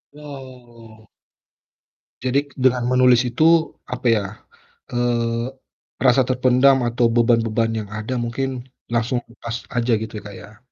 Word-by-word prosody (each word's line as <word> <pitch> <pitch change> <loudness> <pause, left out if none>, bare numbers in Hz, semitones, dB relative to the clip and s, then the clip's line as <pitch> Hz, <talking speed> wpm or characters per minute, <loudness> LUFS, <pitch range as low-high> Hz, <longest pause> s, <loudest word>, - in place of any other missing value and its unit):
Oh. 125 -6 -13 1.2
Jadi 130 +2 +2 0.2
dengan 125 -1 +3
menulis 125 -1 +5
itu, 120 +6 0 0.5
apa 125 0 -3
ya, 105 - 0 0.7
eee, 120 -1 0 0.6
rasa 130 +1 +5
terpendam 130 +1 +4
atau 120 +1 +1
beban-beban 115 -1 +2
yang 105 -2 -7
ada 110 +4 -4
mungkin 130 +3 -2 0.4
langsung 120 +2 0
lepas 115 0 -7 0.2
aja, 120 +1 +1
gitu 110 -1 -6
ya, - - -8
Kak, 100 - -10
ya. 105 +1 -14
120 Hz, 125 wpm, -21 LUFS, 115-130 Hz, 1.2 s, menulis